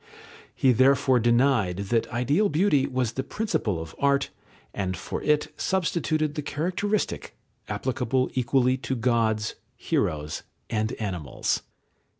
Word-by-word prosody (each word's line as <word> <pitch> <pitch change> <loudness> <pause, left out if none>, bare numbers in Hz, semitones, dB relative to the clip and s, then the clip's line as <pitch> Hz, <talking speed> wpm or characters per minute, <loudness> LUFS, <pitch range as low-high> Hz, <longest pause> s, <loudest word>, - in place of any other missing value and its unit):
He 130 - +4
therefore 130 +1 +4
denied 120 -5 +3 0.2
that 115 - +2
ideal 140 - +2
beauty 150 -4 +3
was 130 -4 -1
the 130 - -2
principle 135 - -1
of 80 0 -7
art, 140 0 +2 0.4
and 95 -2 -2
for - - -5
it 150 0 +1
substituted 160 -4 0
the 150 - -3
characteristic, 185 +8 -2 0.3
applicable 130 0 0
equally 130 +1 +2
to 130 0 -3
gods, 110 -3 +1 0.2
heroes, 75 0 -1 0.3
and 110 0 0
animals. 90 - -2
130 Hz, 120 wpm, -26 LUFS, 110-150 Hz, 0.4 s, He